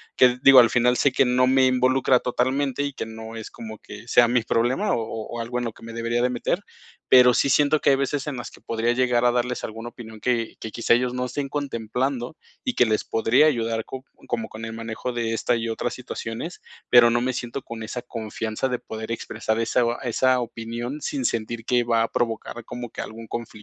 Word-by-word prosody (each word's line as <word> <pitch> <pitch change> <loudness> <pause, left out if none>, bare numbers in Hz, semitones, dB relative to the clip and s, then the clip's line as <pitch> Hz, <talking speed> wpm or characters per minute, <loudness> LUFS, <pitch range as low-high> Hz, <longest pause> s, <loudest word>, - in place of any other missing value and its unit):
Que 125 0 +4
digo, 135 -2 +9
al 115 - +6
final 125 0 +3
sé 140 - +3
que 130 - +3
no 125 +1 +3
me 130 0 +4
involucra 130 0 +3
totalmente, 130 +3 0
y 140 -1 -3
que - - -5
no 110 0 -9
es 110 -1 -7
como 110 -2 -9
que 105 +3 -11
sea 120 0 +5
mi 120 -2 +2
problema, 125 - +1
o - - +1
o 110 -1 -6
o 120 - -3
algo 120 +1 -3
en 120 - -3
lo 115 - -4
que - - -18
me 115 - -8
debería 115 +1 -1
de 125 - +2
meter, 125 +9 -1 0.5
pero 125 -1 +7
sí 140 - +2
siento 145 +2 +3
que - - +3
hay 135 - +5
veces 140 +1 -2
en 140 -4 -3
las 120 - -6
que - - -17
podría 115 +1 0
llegar 125 -1 +2
a 120 - +5
darles 125 0 -1
alguna 115 +2 -7
opinión 110 -2 -11
que 120 -2 0
que 110 - -6
quizá 115 0 +2
ellos 125 +1 +1
no 125 0 -2
estén 135 +2 -4
contemplando, 130 0 -3 0.3
y 255 - -2
que 125 - +5
les 110 -1 0
podría 115 +7 +3
ayudar 115 -5 0
co 130 0 -8 0.2
como 115 -2 -2 0.2
el 115 - -4
manejo 115 +2 -5
de 115 -1 -1
estas 115 +1 +1
y 115 - -3
otras 115 +2 -2
situaciones. 120 +5 -6 0.3
Pero 120 -1 +7
no 120 - +2
me 130 +1 0
siento 120 +2 -4
con 115 -1 -7
esa 120 +3 -5
confianza 110 +1 -3
de 125 -1 -2
poder 110 +1 -7
expresar 110 -1 -2
esa 115 +2 +1 0.2
esa 130 +1 +2
opinión 120 +4 -5
sin 135 -3 -3
sentir 115 0 -2
que 125 -1 +2
va 115 -1 +2
a 115 - 0
provocar 120 0 -2
como 120 0 -6
que - - -6
algún 115 +1 -8
conflicto. 115 0 -5
120 Hz, 225 wpm, -24 LUFS, 115-130 Hz, 0.5 s, digo